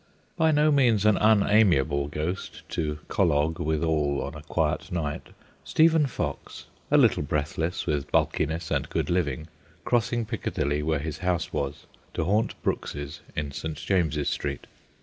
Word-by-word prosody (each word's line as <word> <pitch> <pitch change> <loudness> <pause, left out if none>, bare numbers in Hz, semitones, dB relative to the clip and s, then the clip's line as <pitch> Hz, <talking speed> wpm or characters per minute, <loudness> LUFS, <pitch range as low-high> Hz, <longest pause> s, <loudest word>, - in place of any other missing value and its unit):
By 160 -2 +3
no 150 0 +4
means 120 -8 +3
an 105 -2 +5
unamiable 100 -10 +4
ghost 80 +6 -5
to 75 -2 -2
collogue 80 -3 +1
withal 75 -2 0
on 70 - -5
a 75 - -9
quiet 80 0 -1
night, 75 -4 -3 0.4
Stephen 160 -2 +4
Fox, 90 - -5 0.2
a - - +5
little - - +4
breathless 75 +4 -2
with 75 -1 -2
bulkiness 80 +2 0
and 70 -2 0
good - - -1
living, 75 -4 -1 0.4
crossing 120 -1 +1
Piccadilly, 75 - -2
where 80 0 0
his 75 +1 -5
house 90 -2 -1
was, 70 0 -3 0.3
to - - 0
haunt 105 +6 0
Brooks's 70 0 -3
in 75 -2 -2
St. 75 +2 -5
James's 80 -6 0
Street. - - -3
80 Hz, 145 wpm, -26 LUFS, 75-100 Hz, 0.4 s, an